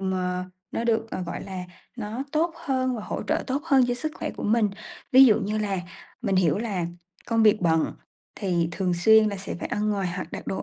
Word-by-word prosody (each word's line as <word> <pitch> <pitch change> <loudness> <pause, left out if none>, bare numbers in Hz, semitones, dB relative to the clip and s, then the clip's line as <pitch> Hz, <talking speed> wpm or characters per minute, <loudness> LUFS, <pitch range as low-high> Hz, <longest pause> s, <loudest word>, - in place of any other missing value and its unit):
mờ 185 -1 -1 0.3
nó 230 - -2
được, 225 -1 +1
ờ, 185 - -3
gọi 170 - -5
là, 190 -2 -6 0.3
nó 225 +3 -4
tốt 325 +2 +1
hơn 255 -2 0
và 215 - -5
hỗ - - -4
trợ - - -1
tốt 275 +2 -1
hơn 265 -2 +5
cho 245 - +1
sức 305 +5 -3
khỏe - - -4
của - - -8
mình. 215 -1 +3 0.4
Ví 265 +1 +10
dụ 225 -2 +5
như 210 +2 -1
là 200 -3 -1 0.4
mình 190 - +1
hiểu 175 -1 +3
là 195 -7 -2 0.4
công 225 -1 +2
việc 215 -1 +5
bận 160 -2 +2 0.4
thì 175 -5 0
thường 185 -1 0
xuyên 220 +5 +6
là 200 - -3
sẽ 195 - -5
phải - - -3
ăn 210 0 0
ngoài 195 -3 0
hoặc - - -6
đặt - - -6
đồ 190 - -2
210 Hz, 225 wpm, -25 LUFS, 185-235 Hz, 0.4 s, Ví